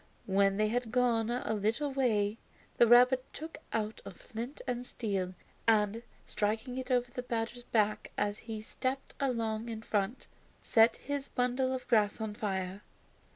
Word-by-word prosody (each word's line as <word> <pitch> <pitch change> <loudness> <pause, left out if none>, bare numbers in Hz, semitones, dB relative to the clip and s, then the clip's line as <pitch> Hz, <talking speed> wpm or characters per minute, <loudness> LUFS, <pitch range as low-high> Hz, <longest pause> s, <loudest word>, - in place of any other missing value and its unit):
When 195 0 +3
they 215 0 +2
had 240 0 -1
gone 240 -2 +2
a 240 -2 -1
little 220 +8 0
way 220 -5 +1 0.4
the 235 - +6
rabbit 250 +2 +7
took 315 +2 -7
out 215 0 -2
a - - -7
flint 230 - -7
and 245 0 -2
steel, 195 -7 -2 0.3
and, 215 0 +3 0.2
striking 220 +5 -1
it 260 0 -6
over 245 -1 +1
the 250 - -4
badger's 240 0 -3
back 215 -2 +1
as 205 +1 0
he 220 -1 -3
stepped 260 +4 -3
along 230 -4 -1
in 220 -1 -5
front, 210 +3 -1 0.4
set 225 0 +5
his 285 -1 -4
bundle 250 +1 +1
of 260 -1 -4
grass 215 -3 +3
on 220 -1 -3
fire. 190 -2 -3
225 Hz, 155 wpm, -32 LUFS, 210-250 Hz, 0.4 s, rabbit